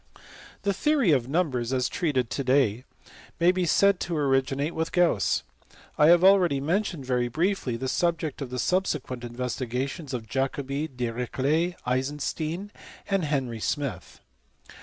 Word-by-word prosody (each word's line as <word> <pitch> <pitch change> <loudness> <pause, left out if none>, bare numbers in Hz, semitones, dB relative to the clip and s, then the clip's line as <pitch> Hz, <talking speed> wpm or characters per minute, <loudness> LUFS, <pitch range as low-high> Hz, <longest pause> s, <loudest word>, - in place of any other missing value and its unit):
The 200 - +1
Theory 275 - +2
of 130 -5 +2
Numbers, 135 -6 0
as 130 -1 +1
treated 130 -8 -1
to 140 - -2
day, 130 -3 +2 0.5
may 170 +1 +5
be 185 -1 -1
said 200 +3 +4
to 170 -2 -2
originate 140 +2 +1
with 160 0 -2
Gauss. 175 - +2 0.5
I 150 - +5
have 175 +1 +6
already 185 -7 +5
mentioned 170 0 -1
very 125 -1 +1
briefly 155 - -1
the 130 - -4
subject 165 -1 -1
of 135 - -4
the 125 - -5
subsequent 145 -6 -1
investigations 125 +4 -4
of 110 -2 -6
Jacobi, 135 +4 -2
Dirich 125 -3 -4
let, 160 +6 +1
Eisenstein, 150 +8 -2 0.4
and 195 -4 +2
Henry 130 -6 -2
Smith. 120 - -4
140 Hz, 140 wpm, -26 LUFS, 125-170 Hz, 0.5 s, have